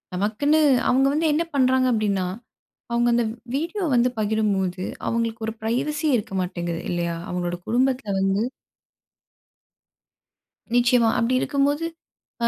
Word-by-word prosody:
நமக்குன்னு 255 +11 +2 0.3
அவங்க 265 +2 +4
வந்து 315 +1 +1
என்ன 330 +3 +1
பண்றாங்க 260 -1 +3
அப்படின்னா, 200 -4 0 0.7
அவங்க 240 0 +2
அந்த 240 -1 +2 0.3
வீடியோ 345 +6 -2
வந்து 245 +1 +3
பகிரும்போது, 200 -4 0 0.2
அவங்களுக்கு 230 -1 -2
ஒரு 225 - -3
பிரைவசி 300 +8 -1
இருக்க 200 -3 -4
மாட்டேங்குது 175 -2 -4
இல்லையா? 170 -1 -1
அவங்களோட 175 -1 -2
குடும்பத்தில 245 -4 +1
வந்து 195 +2 +1 2.3
நிச்சயமா 240 -1 +4
அப்பிடி 240 +2 +1
இருக்கும்போது, 285 +3 +1 0.6
அ - - +4
230 Hz, 115 wpm, -23 LUFS, 195-265 Hz, 2.3 s, அவங்க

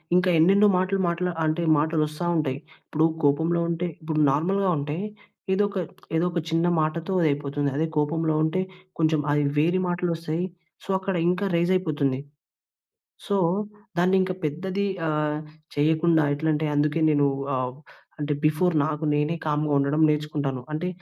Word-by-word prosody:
ఇంక 180 - +4
ఎన్నెన్నో 195 +6 +5
మాటలు 185 +2 0
మాట్లా 180 +1 -1
అంటే 155 +2 0
మాటలొస్తా 155 +1 0
ఉంటాయి. 140 -3 -1 0.3
ఇప్పుడు 155 +1 +1 0.2
కోపంలో 160 +4 +2
ఉంటే 170 +1 -1
ఇప్పుడు 155 -1 -2
నార్మల్‍గా 190 +7 +1
ఉంటే 145 +2 -3 0.6
ఏదో 205 - +3
ఒక 200 - -6 0.4
ఏదో 165 - +2
ఒక 175 - -1
చిన్న 165 +1 +1 0.2
మాటతో 165 +4 -2
అది 165 - +3
అయిపోతుంది. 145 0 -2
అదే 160 - +1
కోపంలో 160 +2 +1
ఉంటే 160 +4 0 0.4
కొంచెం 155 -1 +2
అది 145 - +2 0.2
వేరే 170 +5 +3
మాటలొస్తాయి, 170 -1 -2 0.4
సో, - - -16
అక్కడ 190 -1 -2
ఇంకా 180 +3 0
రైజయిపోతుంది. 160 -7 +1 1.1
సో, 200 - +1 0.6
దాన్నింక 185 +1 +3
పెద్దది 185 +7 -2 0.2
ఆహ్, 150 -1 0 0.4
చేయకుండా 160 +2 +3
ఎట్లంటే 155 +1 0
అందుకే 150 +2 +1
నేను 145 -1 +3 0.3
ఆహ్, 130 -1 -2 0.5
అంటే 150 0 -1
బిఫోర్ 160 +3 +2
నాకు 155 0 -3
నేనే 150 +3 0
కామ్‌గా 150 0 0
ఉండడం 140 +3 +1
నేర్చుకుంటాను. 145 -4 -2
అంటే 160 +4 -2
160 Hz, 140 wpm, -25 LUFS, 150-175 Hz, 1.1 s, ఎన్నెన్నో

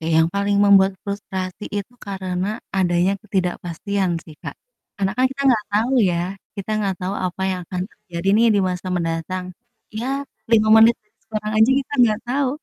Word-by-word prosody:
Eh, 165 +1 -3
yang 160 0 +4
paling 200 0 +1
membuat 195 -1 +6
frustrasi 195 -1 -5
itu 205 +4 -5
karena, 190 -1 -3 0.3
adanya 180 0 +2
ketidakpastian 185 0 -2
sih, 155 - -13
Kak. - - -6 0.4
Karena 195 0 0
kan 255 - +3
kita 275 +1 -4
nggak 220 -4 +3
tau 225 +6 +1 0.2
ya, 170 - -1 0.4
kita 200 +2 -5
nggak 195 -2 0
tau 185 +2 -2
apa 180 +1 -5
yang 185 -1 -2
akan 180 - -3
terjadi 190 -3 -6
nih, 230 +1 +5
di - - +3
masa 180 +1 -4
mendatang. 165 +2 -2 0.5
Ya, 225 +4 -4 0.4
5 215 -2 +4
menit 225 +1 +7 0.3
sekarang 215 -1 -3
aja 220 +4 +6
kita 275 - -10
nggak 215 -3 +3
tahu. 275 +1 +1
195 Hz, 170 wpm, -21 LUFS, 180-215 Hz, 0.5 s, menit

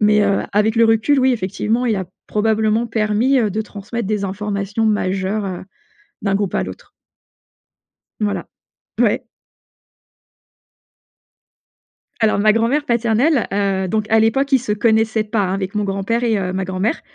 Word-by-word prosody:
Mais, 210 0 +4
heu, 200 -1 +2
avec 210 +2 +2
le 230 - +5
recul 225 +6 +3
oui 260 0 +4
effectivement 220 +3 -1
il 230 - +1
a 190 -2 -3 0.2
probablement 220 +1 +1
permis, 225 +4 +1
heu, 220 -4 +1
de 215 +3 -2
transmettre 215 +1 -5
des 210 -2 -1
informations 205 +2 -2
majeures, 195 0 0
heu, 185 -2 -5 0.6
d'un 195 -1 0
groupe 200 -3 -1
à - - +1
l'autre. 95 0 -9 1.3
Voilà, 210 -1 -2 0.5
ouais. - - +2 2.9
Alors 220 -3 +2
ma 215 +1 +5
grand-mère 235 +7 +1
paternelle, 235 +4 +2
heu, 195 -2 0
donc 215 +2 -1
à 225 - +4
l'époque 270 +6 +1
ils 265 - +6
se 215 - -4
connaissaient 220 0 +2
pas, 215 0 -1
hein, 190 -1 -1
avec 195 +1 -4
mon 210 - 0
grand-père 200 +5 -1
et, 225 -2 +2
heu, 185 -1 -2
ma 190 0 -2
grand-mère. 190 - -1
215 Hz, 155 wpm, -19 LUFS, 200-225 Hz, 2.9 s, ils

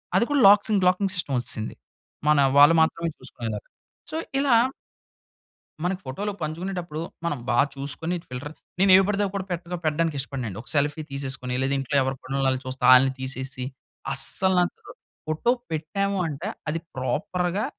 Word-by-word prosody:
అది - - +5
కూడా 290 -1 +2
లాక్సింగ్, 205 -1 +5
locking 185 +1 +2
system 145 -7 -1
వచ్చేసింది. 110 -2 -3 0.5
మన 150 -1 +5 0.2
వాళ్ళు 145 +3 +9
మాత్రమే 165 +1 +1
చూసుకునేలాగా. 110 -3 -6 0.4
సో - - -5 0.2
ఇలా 275 -4 +4 1.3
మనకి 185 +1 -1
ఫోటోలు 200 +11 -3
పంచుకునేటప్పుడు 170 0 -4 0.2
మనం 150 -5 0
బా 120 - +2 0.2
చూసుకొని 145 +5 -3
ఫిల్టర్ 125 +4 -6 0.3
నేను 195 0 +5
ఎవి 190 - +7
పడితే 205 0 0
అవీ 195 - -4
కూడా 190 - -2
పెద్దగా 175 0 -3
పెట్టడానికి 155 0 +1
ఇష్టపడనండి. 130 -7 -4
ఒక - - -20
సెల్ఫీ 145 +2 +1
తీసేసుకొని, 130 -2 -3
లేదా 135 +1 +1
ఇంట్లో 140 +2 -3
ఎవరి 135 +1 -1
పనుల్లోవాళ్ళు 135 -1 0
చూస్తా 130 +1 -6
ఆళ్ళని 130 +1 +6
తీసేసి. 130 0 -5 0.5
అస్సల 190 +7 +1
నాకు 175 - -2 0.3
ఫోటో 155 +10 +1 0.2
పెట్టాము 195 +6 -1
అంటే 155 +6 -5 0.2
అది 165 +2 -1 0.2
ప్రాపర్‌గా 180 +9 -1
155 Hz, 150 wpm, -25 LUFS, 135-185 Hz, 1.3 s, వాళ్ళు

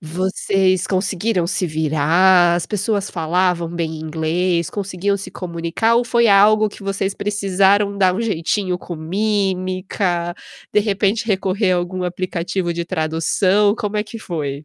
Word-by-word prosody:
vocês 185 +2 0
conseguiram 190 -1 -1
se 185 - -1
virar, 165 +3 +3
as 175 -1 -1
pessoas 205 0 -2
falavam 175 +1 0
bem 165 -2 -4
inglês, 165 +2 -1
conseguiam 200 0 -2
se 200 - -8
comunicar 175 +6 -1
ou 240 - +2
foi 235 -1 +2
algo 210 +2 +5
que 205 - -14
vocês 195 0 -2
precisaram 200 0 +1
dar 185 -2 +3
um 210 - -2
jeitinho 185 -2 -1
com 175 - -7
mímica, 185 0 -1 0.4
de - - +4
repente, 205 +1 0
recorrer 195 -1 +1
a - - +2
algum 180 +1 -3
aplicativo 180 0 -2
de 170 0 -3
tradução. 185 +5 +1
Como 210 -2 -3
é 210 - 0
que 220 - -9
foi? 150 -8 -5
185 Hz, 145 wpm, -19 LUFS, 170-200 Hz, 0.4 s, algo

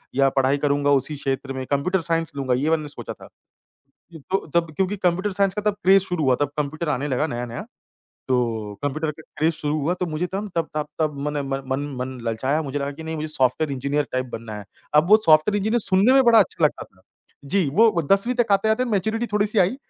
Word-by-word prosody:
या 135 0 +4
पढाई 135 +1 +3
करूँगा 145 0 +1
उसी 140 +2 +1
क्षेत्र 135 0 -3
में, 130 0 -5
कंप्यूटर 145 +8 0
साइंस 165 0 0
लूँगा 135 -2 -1
ये 135 +5 0
मैंने 155 -2 0
सोचा - - -8
था। - - -15 0.8
ये 160 - -10
तो 195 - 0
तब 170 -1 +2
क्योंकि 190 +1 0
कंप्यूटर 185 +2 0
साइंस 195 0 +1
का 210 - -3
तब - - -10
क्रेज़ 195 +1 +5
शुरू 180 -4 -2
हुआ, 130 -2 +4
तब 145 - +2
कंप्यूटर 150 +2 -3
आने 145 0 -1
लगा 140 +3 0
नया-नया। 120 -4 -5 0.7
तो 115 -5 -1
कंप्यूटर 150 +2 -1
का - - -11 0.2
क्रेज़ 160 +2 +2
शुरू 150 0 -2
हुआ 160 +5 0
तो 180 0 -3
मुझे 160 +2 -2
तम 195 +3 -4
तब 165 -2 0
तब 150 -1 -2
तब 155 -2 0
मन 150 - -4
म 135 -1 -3
मन 135 - -1 0.2
मन 130 0 -5
ललचाया, 130 +7 0
मुझे 145 -1 -3
लगा 140 0 -3
कि 155 +3 -10
नहीं 160 0 -5
मुझे 155 0 -3
सॉफ्टवेयर 140 +1 +1
इंजीनियर 140 +2 -1
टाइप 130 0 -1
बनना 110 -1 -6
है। 105 - -9 0.3
अब 150 +3 +4
वो 215 - +10
सॉफ्टवेयर 155 +6 +5
इंजीनियर 220 +4 0
सुनने 200 +4 +3
में 270 0 +6
बड़ा 235 -1 +6
अच्छा 190 -5 +2
लगता 150 - 0
था। 95 - -26 0.4
जी, 165 +3 +1
वो 205 +1 +3
10वीं 200 +6 +3
तक 240 -4 +1
आते-आते 220 +5 +2
मैच्योरिटी 220 +1 -1
थोड़ी-सी 210 +1 +1
आई 190 +7 +3
155 Hz, 225 wpm, -23 LUFS, 140-190 Hz, 0.8 s, वो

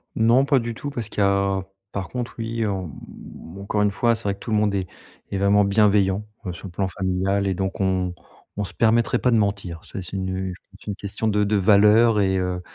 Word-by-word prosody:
Non, 115 +4 +4
pas 140 -1 +3
du 120 0 -4
tout 145 +6 -6
parce 120 -6 -4
qu'il - - -6
y - - +5
a 100 -1 +1 0.3
par 95 -2 -4
contre, 125 -2 -5
oui, 115 0 -2
en, 95 -3 -2
mmh 80 +3 -12
encore 100 +1 -1
une 105 -1 +3
fois, 115 +3 +2
c'est 115 - -9
vrai 100 - 0
que - - -23
tout 115 - -6
le 110 - +3
monde 105 -1 +2
est 95 -2 -2 0.4
est 100 - -1
vraiment 100 +1 +4
bienveillant, 100 0 +3 0.2
heu, 90 - -3
sur 85 +3 -9
le - - -10
plan 95 +2 -1
familial 95 +2 -1
et 95 - +1
donc 95 +1 -3
on 95 -2 0 0.4
on 105 - -1
se 95 - -7
permettrait 115 +1 +2
pas 125 - +2
de 115 - +4
mentir. 100 -5 -1
C'est 95 - -7
c'est 90 +2 -6
nu 95 0 -3
je - - -21
pense 100 - -18
c'est - - -18
une 100 - -2
question 100 +2 -4
de 105 -1 +2
de 105 +1 +1
valeur 105 +3 +5
et 95 -1 +2
heu, 90 -1 -2
100 Hz, 250 wpm, -23 LUFS, 95-110 Hz, 0.4 s, y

